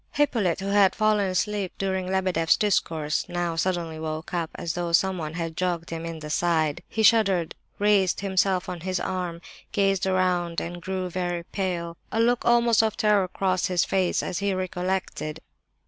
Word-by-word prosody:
V. 290 - +5
Hippolyte, 205 - 0
who 195 - -3
had 200 -2 +4
fallen 215 -2 +2
asleep 200 0 -1
during 190 -1 -1
Lebedeff's 185 -3 +2
discourse, 160 -7 0
now 175 -1 -2
suddenly 165 -2 -1
woke 155 +1 -5
up, 170 -2 -1
just - - -10
as 165 - -2
though 175 -1 -2
someone 170 -4 +1
had 165 -2 -4
jogged 175 -1 -2
him 165 0 -4
in 165 -1 -5
the 150 - -7
side. 160 -3 +1
He 220 - -1
shuddered, 195 -7 +4 0.2
raised 200 -4 +3
himself 190 -1 +1
on 180 -2 -5
his 185 +1 -2
arm, 180 -3 -3 0.3
gazed 195 -2 +1
around, 180 -2 +1
and 175 +1 -6
grew 185 0 -3
very 175 -1 -2
pale. 170 -3 -3
A 225 - -1
look 240 +1 +2
almost 235 -1 +4
of 220 -1 -1
terror 210 -3 +3
crossed 185 0 0
his 180 -2 +1
face 185 -2 +1
as 180 - -3
he 200 -1 0
recollected. 185 -3 -3
185 Hz, 180 wpm, -25 LUFS, 170-195 Hz, 0.3 s, V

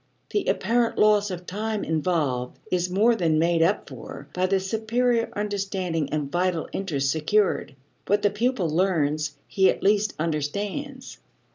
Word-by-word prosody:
The 410 - 0
apparent 230 +3 +1
loss 210 -1 +4
of 180 -1 -6
time 215 +2 -3
involved 150 -6 -1
is 180 0 +1
more 210 +6 +4
than 165 -7 +1
made 165 +1 +2
up 165 - +2
for 135 +2 -9
by 185 +1 +1
the 195 0 +2
superior 230 +4 0
understanding 195 -6 -2
and 150 -2 -2
vital 175 -2 0
interest 140 -8 -1
secured. 170 +1 +1 0.3
What 205 +1 +2
the 205 - +3
pupil 230 -2 0
learns 155 -3 0
he 190 -1 +3
at - - -1
least 205 +1 +2
understands. 200 - -3
185 Hz, 145 wpm, -25 LUFS, 160-210 Hz, 0.3 s, loss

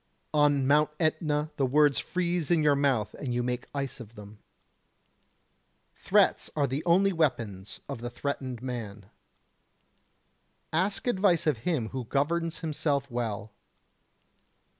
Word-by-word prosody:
On 145 -2 +3
Mount 150 +2 +4
Etna 155 -2 0
the 135 - +2
words 145 +1 +4
freeze 175 -3 -1
in 165 -3 +3
your 145 -1 +4
mouth 135 -7 +1
and 125 -4 -4
you 120 - 0
make 125 0 -3
ice 140 -2 -4
of 115 -1 -11
them. 105 0 -12 1.5
Threats - - +2
are 145 -2 +2
the 140 +3 -3
only 190 +3 +4
weapons 115 - -1
of 115 - -6
the 120 - -4
threatened 130 -1 -4
man. 110 -6 -6 1.6
Ask 190 +5 0
advice 190 -8 +2
of 150 -7 +1
him 125 -10 0
who 130 -2 -5
governs 165 +6 -1
himself 145 -3 -1
well. 110 -3 -3
140 Hz, 130 wpm, -28 LUFS, 120-155 Hz, 1.6 s, Mount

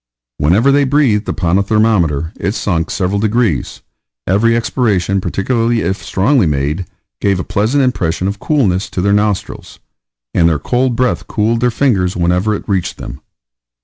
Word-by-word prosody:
Whenever 100 - +3
they 140 +1 +3
breathed 130 -6 +1
upon 85 +2 +1
a - - +3
thermometer 100 -8 +1
it 100 - -1
sunk 85 -4 -1
several 95 +1 -1
degrees; 110 - -1 0.4
every 115 +5 +2
expiration, 100 -5 0
particularly 115 +5 0
if 95 0 -2
strongly 110 - +2
made, 75 +5 -2 0.3
gave 100 -2 +1
a - - -2
pleasant 115 +8 0
impression 95 -8 -1
of 100 +1 -4
coolness 105 -11 0
to - - -5
their 100 +2 +2
nostrils, 105 -1 -2 0.6
and 85 -1 +3
their 80 - +1
cold 125 - 0
breath 115 -9 -1
cooled 110 +2 0
their 125 +1 +2
fingers 110 -8 0
whenever 90 +5 +1
it - - -8
reached 95 -4 -1
them. 70 +5 -8
100 Hz, 155 wpm, -15 LUFS, 90-115 Hz, 0.6 s, Whenever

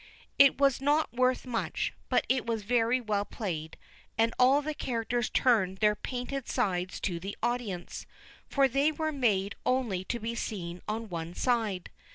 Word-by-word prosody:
It 275 -1 +7
was 275 -2 +3
not 295 -2 +2
worth 255 +1 +2
much, 240 -3 -2 0.2
but - - +2
it 260 -1 +2
was 225 -2 -1
very 235 +3 +2
well 210 -4 0
played, 165 -8 -5 0.4
and 225 +1 +3
all 270 +3 +5
the 310 +1 -2
characters 240 -2 -1
turned 190 -7 +2
their 210 +1 +4
painted 255 +3 -4
sides 180 -1 -1
to 175 -3 -1
the 195 +4 -6
audience, 235 -7 -3 0.4
for 275 -1 +4
they 275 +4 +2
were 315 0 -2
made 210 -8 +1
only 235 -8 0
to 240 - -2
be 230 +1 -3
seen 180 -7 -4
on 220 +1 -3
one 170 -2 -5
side. 220 -7 0
230 Hz, 165 wpm, -30 LUFS, 200-255 Hz, 0.4 s, It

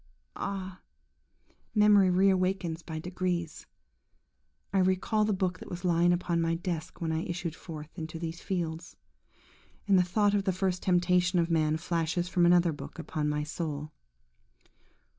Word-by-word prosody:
–Ah! 190 -2 -5 0.9
memory 210 -2 +6
re 190 +2 +4
awakens 185 -3 0
by 160 -1 -6
degrees. 175 -1 -3 1.1
I 195 - +3
recall 190 +3 +2
the 215 - +1
book 185 -2 -1
that - - -10
was 175 +1 -6
lying 175 0 +4
upon 175 -1 0
my 165 0 +1
desk 170 -2 -4
when 165 -1 -2
I 160 0 0
issued 170 -1 -4
forth 155 -3 -9
into 160 -2 -6
these 165 +1 -5
fields; 170 -3 -4 0.9
and 195 -2 +5
the - - +5
thought 205 +3 +2
of 200 -1 +1
the 190 - +1
first 185 -1 -1
temptation 180 0 +2
of 170 0 +1
man 155 -1 +2
flashes 170 +1 -1
from 175 -1 +3
another 175 -1 +5
book 145 - -9
upon 155 -2 -2
my 150 0 -1
soul. 150 -1 -4
175 Hz, 155 wpm, -29 LUFS, 165-185 Hz, 1.1 s, memory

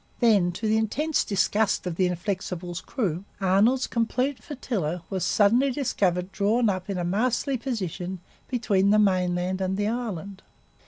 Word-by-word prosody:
Then, 205 -7 +4
to 210 +5 -3
the 215 +1 +3
intense 285 +8 0
disgust 205 +1 +1
of 180 -2 -3
the 185 +1 +2
Inflexible's 180 -1 -4
crew, 190 - -2 0.2
Arnold's 205 +7 +3
complete 250 +4 -1
flotilla 185 - -3
was 190 -2 -1
suddenly 235 +7 +3
discovered 190 -9 0
drawn 215 +4 +2
up 185 0 -3
in 195 - -2
a 175 - -1
masterly 245 +8 0
position 190 - -4 0.3
between 205 -6 +1
the 210 - +5
mainland 185 -2 +1
and 190 0 -1
the 205 0 0
island. 200 -5 -4
200 Hz, 150 wpm, -26 LUFS, 185-230 Hz, 0.3 s, the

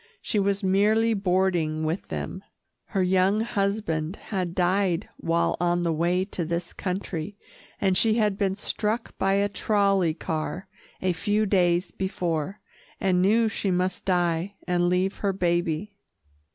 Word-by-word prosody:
She 210 - -1
was 200 +1 0
merely 215 +4 +3
boarding 180 -5 +1
with 160 +4 -2
them. 190 - -5 0.4
Her 195 -2 0
young 190 +3 +3
husband 200 -6 -1
had 180 -6 -4
died 180 -1 +1
while 165 +1 +1
on 175 0 +2
the 165 -1 +1
way 175 +4 +1
to 190 -3 -4
this 170 +2 -3
country, 185 0 -4 0.4
and 190 -2 +2
she 220 +3 +3
had 210 -3 +2
been 195 -1 0
struck 215 +3 -2
by 195 0 +2
a 200 +1 +3
trolley 200 -5 +1
car 160 +3 -4 0.4
a 185 -1 +2
few 210 +5 +1
days 180 -2 +2
before, 180 -1 -2 0.4
and 185 -2 +2
knew 220 +4 +4
she 215 -2 -2
must 185 0 0
die 175 +1 0
and 175 -1 +2
leave 185 +2 +1
her 200 -2 0
baby. 175 +1 0
185 Hz, 145 wpm, -26 LUFS, 175-200 Hz, 0.4 s, knew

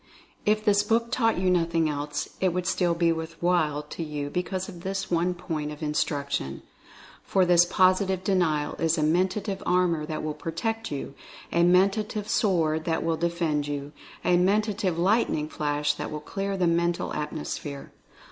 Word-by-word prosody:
If 215 +1 +2
this 205 -1 +4
book 230 +3 +1
taught 225 -3 +2
you 185 0 +2
nothing 165 -2 +2
else, 145 0 -3
it 185 -2 +2
would 180 0 -2
still 175 -2 +1
be 170 0 +3
"worth 160 0 -4
while" 160 -4 +1
to 150 - -8
you 150 -2 -4
because 185 +2 -2
of 170 - -10
this 190 +1 -3
one 175 +1 +1
point 160 -4 -4
of 150 +1 -8
instruction. 140 - -2 0.6
For 190 -2 +2
this 175 -1 +6
Positive 185 +1 +2
De 195 - +1
nial 155 -5 +1
is 165 0 +2
a 155 - +1
Mentative 190 +5 0
Armor 175 -4 +1
that 155 -1 -4
will 155 -1 -2
protect 225 +9 -3
you 140 -1 -5 0.2
— - - -17
a 170 - +3
Mentative 200 +4 +2
Sword 160 -8 +1
that 165 -1 0
will 165 -1 +1
defend 165 -3 -1
you 145 0 -4 0.2
— - - -19
a 180 - +4
Mentative 200 -1 +1
Lightning 180 -4 +2
Flash 150 -1 0
that - - -5
will 150 - -4
clear 195 +5 -3
the 180 - +2
Mental 170 0 +1
Atmosphere. 150 -1 -5
170 Hz, 175 wpm, -26 LUFS, 155-190 Hz, 0.6 s, this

